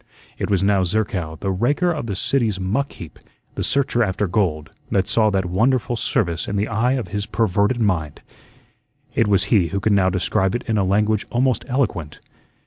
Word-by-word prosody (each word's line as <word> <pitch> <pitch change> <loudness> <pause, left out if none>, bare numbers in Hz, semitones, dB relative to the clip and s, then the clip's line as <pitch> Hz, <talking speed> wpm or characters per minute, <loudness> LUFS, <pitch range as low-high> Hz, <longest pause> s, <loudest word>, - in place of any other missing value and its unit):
It - - -2
was 100 -2 +2
now 100 -1 +3
Zerkow, 90 -4 -1
the 95 - -1
raker 145 - +1
of 150 -8 -4
the 100 - -3
city's 110 -1 0
muck 110 +10 -1
heap, 85 - -11 0.3
the - - -3
searcher 130 -3 +1
after 105 0 -1
gold, 85 -5 -1 0.2
that 95 0 +1
saw 110 0 +3
that 95 -2 0
wonderful 120 +7 +1
service 85 -7 -1
in 100 - -3
the 100 +1 0
eye 115 +3 +1
of 130 -3 -3
his 105 0 -3
perverted 105 +2 +1
mind. 85 -9 -1 0.9
It 115 - +2
was 100 -2 +3
he 95 -6 +4
who 100 +3 -2
could 105 +2 +1
now 95 -2 +3
describe 95 +1 0
it 120 - -3
in 110 -2 0
a - - +2
language 105 +2 +1
almost 130 +1 +1
eloquent. 105 - -2
100 Hz, 190 wpm, -21 LUFS, 95-115 Hz, 0.9 s, he